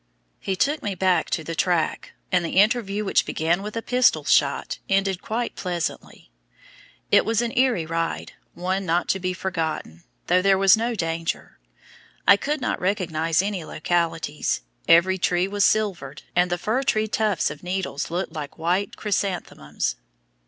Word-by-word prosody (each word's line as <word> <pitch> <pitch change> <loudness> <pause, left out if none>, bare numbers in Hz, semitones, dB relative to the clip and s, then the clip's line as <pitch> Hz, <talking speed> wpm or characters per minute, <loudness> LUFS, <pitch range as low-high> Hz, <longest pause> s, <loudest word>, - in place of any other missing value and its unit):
He 190 - -2
took 290 +10 +1
me 205 -2 -3
back 180 -2 +1
to 160 - -1
the 165 - -5
track; 170 0 0 0.2
and 180 -2 +3
the 170 - -3
interview 210 -1 +2
which - - +3
began 165 +4 0
with 210 +2 -6
a 230 - -3
pistol 250 -11 +3
shot, 145 -4 +2
ended 195 -1 +1
quite 235 +2 -3
pleasantly. 175 - -5 0.8
It - - +6
was 225 -1 0
an 235 - -3
eerie 245 -10 +2
ride, 165 +1 -3 0.2
one 185 +2 -1
not 175 0 0
to 190 - +1
be 185 0 -1
forgotten, 165 - -4 0.2
though 180 +1 +3
there 195 0 +4
was 195 0 +6
no 230 +2 -1
danger. 165 -3 -3 0.7
I 200 - +9
could 295 +7 -2
not 250 - -2
recognize 170 -3 0
any 200 -4 -3
localities. 165 -1 -1 0.3
Every 185 +3 +5
tree 175 +1 +1
was 205 0 +2
silvered, 180 -11 0
and 180 0 +3
the 175 - 0
fir 220 +8 0
tree 220 -5 +1
tufts 215 -4 0
of 145 - -10
needles 180 -5 -3
looked 170 -1 -3
like 150 -3 -6
white 180 +5 0
chrysanthemums. 185 - -2
185 Hz, 160 wpm, -24 LUFS, 165-205 Hz, 0.8 s, I